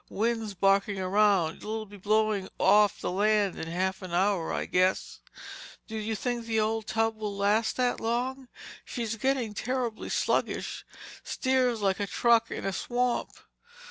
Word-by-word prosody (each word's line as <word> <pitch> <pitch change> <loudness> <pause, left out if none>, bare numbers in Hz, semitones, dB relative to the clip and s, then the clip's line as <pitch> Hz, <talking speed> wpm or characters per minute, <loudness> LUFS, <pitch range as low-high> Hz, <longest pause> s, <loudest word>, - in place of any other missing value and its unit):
"Wind's 225 -1 -1
barking 195 +1 +2
around—it'll 205 +2 +1
be 205 0 -13
blowing 210 0 +1
off 205 +2 +4
the - - -2
land 205 0 +2
in 160 - -5
half 190 +3 -2
an 180 -2 -5
hour, 190 -2 +1
I - - -2
guess." 185 +1 +1 0.7
"Do 220 - -8
you 220 0 -2
think 240 +2 -3
the 225 -1 +1
old 220 0 -1
tub 225 0 0
will 210 -2 -4
last 210 +3 +1
that 250 -1 +1
long? 250 +3 -2 0.4
She's 230 -3 -4
getting 250 -1 0
terribly 245 0 -3
sluggish. - - -1 0.4
Steers 255 -4 0
like 195 0 +1
a 200 - -1
truck 230 +3 +3
in - - -5
a 195 - -1
swamp!" 245 +4 -1
215 Hz, 150 wpm, -28 LUFS, 195-230 Hz, 0.7 s, off